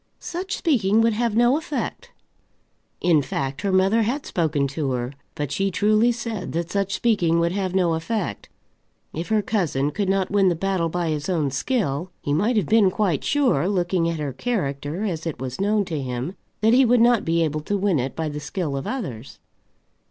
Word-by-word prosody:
"Such 370 +4 -4
speaking 225 - +2
would 230 0 +3
have 230 0 0
no 240 +4 +4
effect." 325 +9 -4 0.9
In 165 -4 +4
fact, 135 0 -3
her 200 - 0
mother 190 +4 +3
had 250 +7 -1
spoken 150 -5 0
to 140 -2 -2
her, 125 +2 -3 0.2
but 145 -2 -3
she 195 +4 0
truly 215 +5 +3
said 230 -4 -4
that 170 +1 -2
such 195 -1 0
speaking 175 -8 +2
would 170 0 +1
have 190 -1 -2
no 175 -3 +3
effect. 165 - -3 0.6
If 165 +2 -4
her 215 -1 +2
cousin 160 -9 0
could 195 +4 -1
not 195 -1 +1
win 200 -2 +4
the 175 - 0
battle 185 -1 0
by 175 0 -1
his 150 +2 -2
own 155 -6 0
skill, 175 - -1
he 145 - -2
might 215 +10 +2
have 205 - +2
been 215 +2 +4
quite 185 -7 0
sure, 275 - +2
looking 175 -3 +1
at 165 - -2
her 145 -3 -3
character 150 - -2
as 170 -6 -3
it 160 - -3
was 130 +4 -5
known 205 0 +2
to 160 -5 -3
him, 125 +6 -4 0.3
that 220 +2 +4
he 260 +2 +6
would 245 0 +4
not 235 -1 +4
be 165 0 +1
able 155 -1 -1
to 205 +7 -1
win 190 -6 +1
it 130 +2 -3
by 160 -1 -2
the 150 0 -4
skill 150 0 -3
of 135 - -4
others. 135 - -5
185 Hz, 200 wpm, -23 LUFS, 150-215 Hz, 0.9 s, he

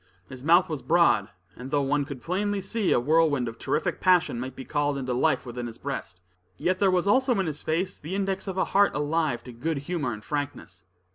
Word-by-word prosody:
His 130 0 -10
mouth 170 +4 +5
was 155 -5 -4
broad, 130 - +3 0.3
and 125 +2 -8
though 145 0 +1
one 145 +1 +1
could 135 -3 -8
plainly 200 +3 -1
see 200 +1 -1
a - - +4
whirlwind 145 -1 +2
of 115 0 -7
terrific - - -1
passion 180 -9 +3
might 130 +1 -5
be 130 - -8
called 145 -1 0
into 130 -2 -2
life 125 - +1
within 120 0 -5
his 115 - -9
breast, 90 +1 -6 0.3
yet 185 - 0
there 195 - +4
was, 185 -1 +2
also 255 +1 +3
in 190 - +1
his 155 -2 -4
face, 180 +4 -2
the 165 +6 -5
index 195 0 -2
of 190 -1 -4
a - - +2
heart 200 0 +3
alive 150 -3 0
to 125 - -9
good 140 +7 -3
humor 145 -2 -2
and 105 -1 -7
frankness. 140 -11 -5
150 Hz, 220 wpm, -26 LUFS, 130-185 Hz, 0.3 s, mouth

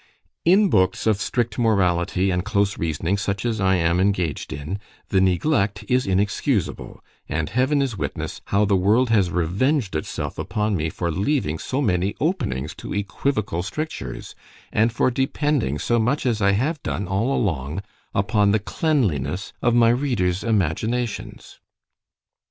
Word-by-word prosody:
In 195 +3 +5
books 95 -2 +2
of 105 -2 +2
strict 120 +2 -1
morality 95 -4 +2
and 90 0 0
close 100 -1 +1
reasoning, 80 +4 -1
such 100 0 -2
as 115 -2 -1
I 95 0 +3
am 85 0 +2
engaged 95 -5 0
in—the 95 +4 -3
neglect 100 - +1
is 125 0 +1
inexcusable; 100 - -1 0.3
and 80 0 -1
Heaven 130 +4 +2
is 125 -6 -3
witness, - - -4
how 100 +1 +2
the 100 -1 +2
world 110 +6 +3
has 100 -5 +3
revenged 95 - 0
itself 75 - -4
upon 105 -1 -1
me 80 -2 -1
for 85 +1 -2
leaving 95 - 0
so 135 +2 -2
many 95 -3 +1
openings 75 - -1
to - - -6
equivocal 100 -2 -1
strictures—and 110 - -4
for 130 - +1
depending 135 - 0
so 120 +10 +1
much 125 +7 0
as 115 -4 +1
I 100 0 +4
have 145 +9 0
done, 100 - -3
all 100 +8 0
along, 80 - -2 0.3
upon 100 +1 +2
the 105 +2 +3
cleanliness 100 - -1
of 120 -1 +2
my 115 -1 +5
readers 115 -8 0
imaginations. 110 +3 -2
100 Hz, 145 wpm, -23 LUFS, 90-120 Hz, 0.3 s, In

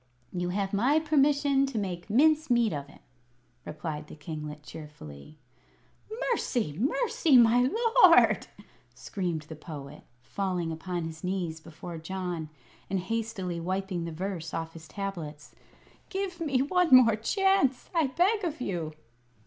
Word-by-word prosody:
"You 180 -1 -2
have 195 +1 -2
my 255 +10 +3
permission 285 -2 +3
to 270 - -4
make 185 -3 -4
mince 310 +7 +4
meat 235 -3 +3
of 140 -1 -5
him," - - -18 0.6
replied 155 -1 -5
the - - -10
kinglet, 150 -1 -7
cheerfully. 150 - -11 0.9
"Mercy! 235 - -1
mercy, 330 - +2
my 240 +1 +6 0.4
lord!" - - +6 0.5
screamed 175 -6 -3
the 155 +1 -9
Poet, 150 -2 -9 0.2
falling 180 +2 -2
upon 175 +2 -4
his 160 0 -7
knees 180 -3 -2
before 165 +1 -9
John 175 -2 -4 0.4
and 195 -1 0
hastily 190 -3 -3
wiping 185 0 -2
the 170 - -5
verse 170 -1 -4
off 165 0 -4
his 160 -1 -11
tablets, 170 -7 -6 0.6
"give 385 -2 -3
me 275 -6 +1
one 360 +4 +2
more 230 -4 +7
chance, 275 - +1
I 325 -4 +3
beg 375 - +1
of 320 -4 -3
you!" 175 -9 -3
190 Hz, 135 wpm, -28 LUFS, 160-265 Hz, 0.9 s, more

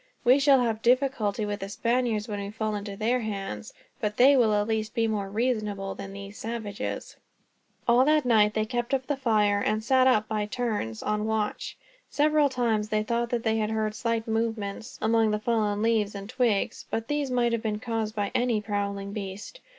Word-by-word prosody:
We 255 +3 +5
shall 275 -2 +5
have 225 -2 -1
difficulty 240 -4 +1
with 205 0 -3
the 195 - -5
Spaniards, 235 0 0
when 205 -2 -4
we 200 0 -4
fall 215 0 -3
into 205 -1 -5
their 235 +4 +1
hands; 195 - -5 0.3
but 210 -4 -2
they 275 +3 +7
will 235 -5 +4
at 205 0 +1
least 220 0 -2
be 230 -2 +2
more 205 -3 -2
reasonable 210 -3 -1
than 195 - -8
these 200 +1 -9
savages." 220 -3 -5 0.7
All 240 +2 +5
night 245 -8 +3
they 215 0 +1
kept 240 +3 -1
up 260 -1 -3
their 290 - -1
fire, 215 -6 +2
and 215 +1 0
sat 260 +2 +4
up 215 -5 +3
by 210 -1 -1
turns, 210 - -3
on 210 0 -1
watch. 220 -1 -2 0.3
Several 300 0 +3
times 230 -5 0
they 215 0 +1
thought 235 +2 -1
that 235 -1 -1
they 225 -1 +1
heard 215 0 -1
slight 230 0 -2
movements, 225 -2 -3
among 225 0 +3
the 210 - +1
fallen 215 -2 0
leaves 220 -3 +1
and 200 0 -6
twigs; 240 -4 0
but 225 0 -3
these 295 -2 -1
might 245 -1 +1
have 230 -1 0
been 215 -2 -2
caused 225 -2 -3
by 205 -1 -1
any 240 -3 +1
prowling 200 -1 -3
beast. 205 - -7
220 Hz, 190 wpm, -27 LUFS, 210-240 Hz, 0.7 s, they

